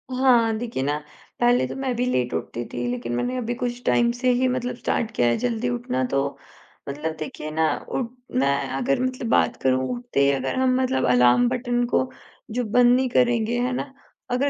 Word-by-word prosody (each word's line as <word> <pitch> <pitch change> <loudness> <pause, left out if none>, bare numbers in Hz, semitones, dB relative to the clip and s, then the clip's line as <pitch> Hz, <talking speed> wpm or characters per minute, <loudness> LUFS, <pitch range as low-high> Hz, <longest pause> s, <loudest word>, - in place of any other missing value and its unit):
हाँ, 235 -4 +4
देखिए 230 - -4
ना, 145 +1 0 0.4
पहले 245 +1 +3
तो - - -7
मैं 265 -2 -2
भी 245 +1 0
लेट 125 - 0
उठती 115 +8 -3
थी, 120 0 -3
लेकिन 120 -1 -4
मैंने 250 - -1
अभी 240 0 -2
कुछ 245 -1 -3
टाइम 235 0 +3
से 255 0 +2
ही 255 +1 +2
मतलब 250 -1 -2
स्टार्ट 230 -2 -1
किया 120 - +3
है, 120 - +2
जल्दी 245 0 -1
उठना 240 - -2
तो, 140 0 -1 0.5
मतलब 155 +3 -3
देखिए 155 0 -6
ना 160 0 +2 0.2
उठ 245 -3 -2 0.3
मैं 140 +1 +3 0.2
अगर 265 0 +1
मतलब 255 -2 -2
बात - - +3
करूँ 130 0 +2
उठते 240 - -3
ही - - +4
अगर 135 -1 -2
हम 255 -1 +3
मतलब 260 +1 +1
अलार्म 125 - +5
बटन 245 -1 0
को 255 +1 +1 0.4
जो 245 +2 -1
बंद 245 +3 +5
नहीं 260 0 +1
करेंगे, 240 -1 +2
है 250 +1 0
ना? 270 +2 -4 0.4
अगर 260 +3 +1
240 Hz, 200 wpm, -24 LUFS, -, 0.5 s, अलार्म